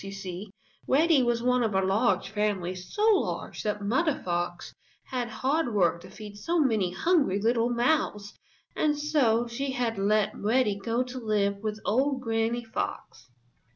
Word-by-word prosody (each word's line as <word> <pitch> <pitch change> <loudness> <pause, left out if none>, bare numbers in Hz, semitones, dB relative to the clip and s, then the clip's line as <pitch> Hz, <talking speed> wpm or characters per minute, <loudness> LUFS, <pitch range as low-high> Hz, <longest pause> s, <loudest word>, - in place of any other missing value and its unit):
You 195 - -7
see, 195 0 -7 0.4
Reddy 305 +1 +4
was 240 -1 0
one 250 0 +2
of 220 -4 0
a 190 - +3
large 195 -1 +1
family, 205 -4 -1
so 185 - -2
large - - -4
that 210 -1 -2
Mother 285 +9 +1
Fox 175 0 -3 0.3
had 250 -2 -3
hard 265 0 -1
work 170 -3 +2
to - - -12
feed 210 -1 -10
so 335 +11 0
many 220 - +2
hungry 280 - +2
little 230 +2 +2
mouths 240 -4 0 0.4
and 300 -1 +1
so 280 -6 +2
she 265 +3 -3
had 235 -5 -1
let 210 +1 +2
Reddy 220 0 +1
go 230 +5 0
to 255 0 -7
live 205 -3 0
with 215 +1 -4
old 265 +5 +1
Granny 230 0 -1
Fox. 125 - -5
225 Hz, 160 wpm, -27 LUFS, 200-255 Hz, 0.4 s, Reddy